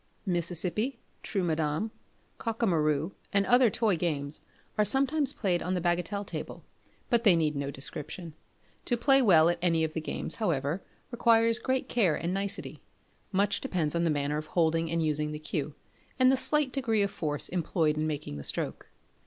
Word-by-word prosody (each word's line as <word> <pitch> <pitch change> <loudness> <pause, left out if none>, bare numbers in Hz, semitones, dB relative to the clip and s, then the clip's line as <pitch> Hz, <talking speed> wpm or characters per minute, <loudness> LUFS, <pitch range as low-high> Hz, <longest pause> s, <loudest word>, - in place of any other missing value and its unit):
Mississippi, 180 - -1 0.2
Trou 195 -3 -2
Madame, 160 +5 -1 0.5
Cockamaroo, 165 - 0 0.2
and 200 0 +2
other 245 -1 +5
toy 215 -2 +1
games 155 -4 0 0.3
are 210 - +3
sometimes 275 +5 +3
played 185 -9 0
on 185 +1 -1
the - - 0
bagatelle 180 +4 -1
table; - - -7 0.5
but 235 -1 +3
they 200 -6 +6
need 155 -2 +1
no 140 0 -2
description. 150 +4 -7 0.5
To 240 - +1
play 270 +3 +5
well 170 -9 +6
at 175 0 +1
any 165 -2 +2
of 155 -1 -2
the 160 - -3
games, - - 0
however, 160 -2 0 0.3
requires 230 -1 +3
great 260 0 -1
care 195 -10 +2
and 170 +2 -2
nicety. 195 0 -3 0.5
Much 200 0 +1
depends 175 - -1
on 170 0 0
the 170 - +2
manner 145 0 0
of 155 - -8
holding 165 -1 +1
and 165 0 0
using 150 0 +1
the - - -4
cue, 150 -1 -4 0.4
and 255 0 +5
the - - +4
slight 290 +1 +1
degree 230 -6 +1
of 200 - -1
force 150 -2 -2
employed 165 -3 0
in 155 0 -1
making 145 - -4
the 70 - -7
stroke. - - -3
175 Hz, 175 wpm, -29 LUFS, 155-220 Hz, 0.5 s, they